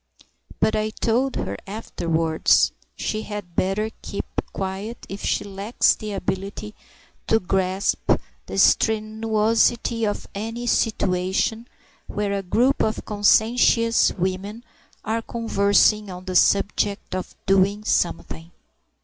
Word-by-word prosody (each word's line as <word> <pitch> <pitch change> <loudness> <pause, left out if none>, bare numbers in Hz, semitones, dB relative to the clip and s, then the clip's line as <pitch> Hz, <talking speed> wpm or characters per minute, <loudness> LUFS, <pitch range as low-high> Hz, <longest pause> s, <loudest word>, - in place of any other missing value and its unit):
But 220 - +2
I 215 0 0
told 240 +4 0
her 100 - -3
afterwards, 165 -6 +1 0.2
she 215 - -2
had 205 -6 -7
better 210 +4 0
keep 200 - -5 0.3
quiet 195 +4 -5
if 195 +1 -7
she - - 0
lacks 200 +3 +1
the 215 -2 -6
ability 200 +2 -4 0.5
to 225 - +4
grasp 190 0 0 0.4
the - - -5
strenuosity 220 +1 +2
of 205 - -5
any 225 +4 -5
situation 215 0 0 0.4
where 205 -1 -2
a 200 - -1
group 240 +9 +2
of 220 - -1
conscientious 230 +2 +3
women 195 +5 -3 0.4
are 225 +2 -1
conversing 210 -2 +2
on 180 0 -8
the 185 -1 -4
subject 200 +1 +2
of 185 0 -5
"doing 195 +2 +2
something." 165 -4 -1
210 Hz, 115 wpm, -23 LUFS, 190-220 Hz, 0.5 s, to